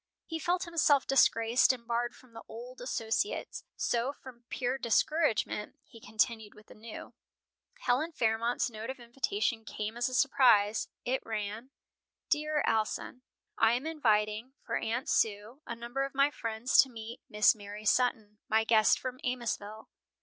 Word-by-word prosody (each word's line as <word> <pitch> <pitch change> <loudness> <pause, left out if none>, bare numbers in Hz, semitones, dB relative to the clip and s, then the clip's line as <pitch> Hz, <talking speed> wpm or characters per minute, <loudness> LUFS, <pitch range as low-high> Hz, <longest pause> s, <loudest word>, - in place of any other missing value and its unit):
He 325 -1 -4
felt 350 +3 0
himself 315 -5 +3
disgraced 235 -2 +4
and 245 -2 -7
barred 235 +1 -1
from 255 -3 -20
the 225 - -9
old 245 +3 -9
associates; 245 - -2
so, 240 +3 0
from 250 -4 -14
pure 255 +1 -2
discouragement, 235 -3 +1
he 230 - -15
continued 220 0 -1
with 210 - -16
the - - -14
new. 220 +1 -10 0.7
Helen 310 - +1
Fairmont's 230 -3 0
note 225 -1 -7
of 265 - -5
invitation 240 - -2
came 215 +1 -5
as 240 +2 0
a 255 - -4
surprise. 225 -7 +4 0.2
It 260 +2 -1
ran: 220 +2 -4 0.6
"DEAR 300 0 +1
ALSON: 225 +3 -1 0.4
I 225 +1 +5
am 250 +4 -1
inviting, 225 -5 0
for - - -2
Aunt 240 +5 -2
Sue, 215 +5 0
a 235 - -4
number 235 +3 -4
of 275 0 -5
my 280 +1 +4
friends 230 -1 0
to 265 - +7
meet 230 0 -9
Miss 210 -1 +5
Mary 210 0 -9
Sutton, 215 -3 +1
my 220 0 +3
guest 220 -2 +4
from 255 0 -6
Amosville. 220 -4 -3
235 Hz, 155 wpm, -31 LUFS, 220-260 Hz, 0.7 s, to